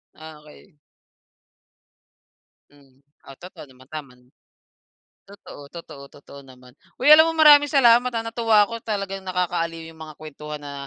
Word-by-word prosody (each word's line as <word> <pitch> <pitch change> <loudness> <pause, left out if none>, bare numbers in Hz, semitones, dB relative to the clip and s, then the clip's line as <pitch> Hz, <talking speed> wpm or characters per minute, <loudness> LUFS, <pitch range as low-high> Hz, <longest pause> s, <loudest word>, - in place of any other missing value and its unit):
Ah, 155 -1 -13
okey. 150 +3 -20 2.0
Hmm. 135 -2 -25 0.2
Ah, 135 -1 -15
totoo 180 -4 -13
naman, 130 0 -20
tama. 140 -5 -10 1.1
Totoo 195 -8 -15
totoo 150 -5 -12
totoo 140 0 -16
naman. 125 -1 -19 0.2
Uy, - - -4
alam 315 +2 +7
mo - - -5
maraming 290 -2 +6
salamat, 245 -4 +4
ha, 230 -1 -4
na 230 - -8
natuwa 220 -3 +2
ko 230 0 -9
talagang 195 -3 -5
nakakaaliw 170 -3 -4
'yong 165 0 -15
mga 155 -2 -13
kwentuhan 150 0 -10
na, 145 -1 -11
165 Hz, 145 wpm, -21 LUFS, 145-220 Hz, 2.0 s, alam